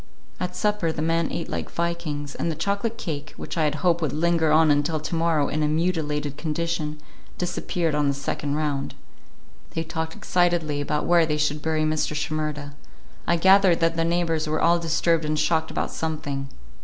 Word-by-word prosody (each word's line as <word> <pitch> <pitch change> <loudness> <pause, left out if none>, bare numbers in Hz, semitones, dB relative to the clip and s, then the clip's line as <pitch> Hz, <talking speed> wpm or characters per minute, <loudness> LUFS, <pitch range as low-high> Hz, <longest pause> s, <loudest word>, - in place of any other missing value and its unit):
At 180 0 -3
supper 210 -6 +1
the 155 -1 -3
men 165 0 +1
ate 170 - -3
like - - -4
vikings, 165 -4 -3
and - - -2
the 160 - -2
chocolate 200 +7 -1
cake, 150 -7 -5
which - - -6
I 160 -2 +2
had 150 0 +1
hoped 170 -1 +3
would 155 -5 -1
linger 165 0 +2
on 155 0 +5
until 145 +2 +1
to 155 - -5
morrow 165 -3 +2
in 155 - -1
a 150 - +2
mutilated 150 -3 -1
condition, 155 -1 -2 0.4
disappeared 175 -2 -1
on 150 -1 +2
the 140 - +1
second 140 +1 -2
round. 145 -3 -2 0.8
They 165 - 0
talked 160 0 -4
excitedly 175 -5 +1
about 150 +1 -1
where 170 -2 +4
they 150 -1 0
should 150 0 0
bury 155 0 0
Mr. 155 -1 0
Shimerda; 150 -1 -3 0.5
I 170 - +4
gathered 190 0 +5
that 165 0 +2
the 165 - +1
neighbors 165 -2 0
were 155 +1 0
all 170 +1 +4
disturbed 165 0 +1
and 155 0 -1
shocked 160 +1 +1
about - - -2
something. 145 -4 -3
160 Hz, 185 wpm, -24 LUFS, 150-170 Hz, 0.8 s, on